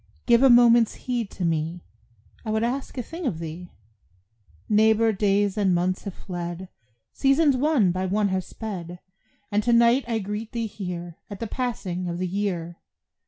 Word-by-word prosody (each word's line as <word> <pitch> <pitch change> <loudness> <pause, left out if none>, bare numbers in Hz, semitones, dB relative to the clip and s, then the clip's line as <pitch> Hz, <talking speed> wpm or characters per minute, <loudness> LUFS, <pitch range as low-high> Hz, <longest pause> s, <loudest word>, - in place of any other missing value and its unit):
Give 235 0 +5
a 270 - +6
moment's 240 -2 +6
heed 240 -5 -3
to 185 - -4
me, 165 +1 -2 0.6
I 225 - -5
would 220 +1 0
ask 260 +3 -3
a 250 - -2
thing 330 +4 -5
of 180 - -2
thee. 165 +2 -7 1.0
Neighbor, 220 +1 +4
days 205 0 +1
and 190 -3 +3
months 185 +3 -1
have 200 - -5
fled, 175 0 -6 0.4
Seasons 275 +1 +3
one 260 - +3
by 185 +1 -2
one 205 +2 +1
have 190 0 -1
sped, 180 -6 -7 0.5
And 205 +1 +2
to 235 +2 +1
night 235 +3 +5
I 230 -2 0
greet 210 +2 -5
thee 230 -1 -2
here 180 -5 -6
At 200 -2 -8
the 230 - -3
passing 200 -7 -3
of 170 - -3
the 185 - -2
year. 175 -3 -3
205 Hz, 170 wpm, -25 LUFS, 180-235 Hz, 1.0 s, a